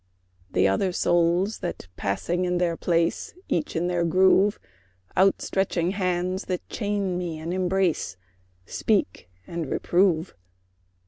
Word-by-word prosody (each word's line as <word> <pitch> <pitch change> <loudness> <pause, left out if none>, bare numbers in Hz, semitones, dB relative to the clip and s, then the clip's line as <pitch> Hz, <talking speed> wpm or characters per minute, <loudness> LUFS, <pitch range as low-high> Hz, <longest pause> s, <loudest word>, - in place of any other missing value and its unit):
The 95 - +3
other 140 - +1
souls 175 +4 +2
that, 175 - -5
passing 170 - -1
in 180 0 0
their 175 -1 +1
place, 165 - 0
Each 155 - -1
in 165 +2 0
their 175 -1 0
groove; 190 +4 +4 0.6
Out 195 +1 +3
stretching 185 -2 0
hands 185 -1 -1
that 180 -2 -4
chain 200 -4 -1
me 170 -3 -4
and 165 +3 -4
embrace, 185 - 0 0.5
Speak 145 - -1 0.2
and 170 - -4
reprove. 175 0 +1
180 Hz, 125 wpm, -25 LUFS, 170-190 Hz, 0.6 s, groove